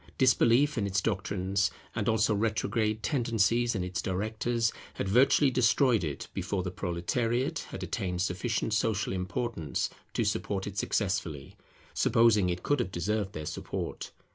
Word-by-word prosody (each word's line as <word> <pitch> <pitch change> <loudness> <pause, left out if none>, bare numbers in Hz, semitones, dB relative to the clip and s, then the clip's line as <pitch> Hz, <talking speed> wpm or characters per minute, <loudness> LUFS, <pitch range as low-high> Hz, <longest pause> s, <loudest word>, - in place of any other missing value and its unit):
Disbelief 130 +2 +4
in 100 - 0
its 95 0 +1
doctrines, 95 -2 0 0.2
and - - -1
also 110 -1 +3
retrograde 110 +1 0
tendencies 120 -3 +1
in 95 - -1
its 90 0 -3
directors, 110 +4 -1 0.2
had - - -2
virtually 135 +6 +4
destroyed 125 -3 +3
it, 75 -4 -4
before 95 0 -2
the 90 - -3
Proletariate 115 +8 -1
had - - -6
attained 90 -1 -2
sufficient 105 +4 -1
social 105 -3 0
importance 95 -3 -2 0.2
to - - +1
support 95 -2 -1
it 100 - -6
successfully, 90 -11 -2 0.4
supposing 110 -5 +4
it 90 0 -3
could 145 -1 +1
have 95 -6 -1
deserved 100 +3 -1
their 80 - -5
support. - - -5
105 Hz, 140 wpm, -29 LUFS, 95-115 Hz, 0.4 s, Disbelief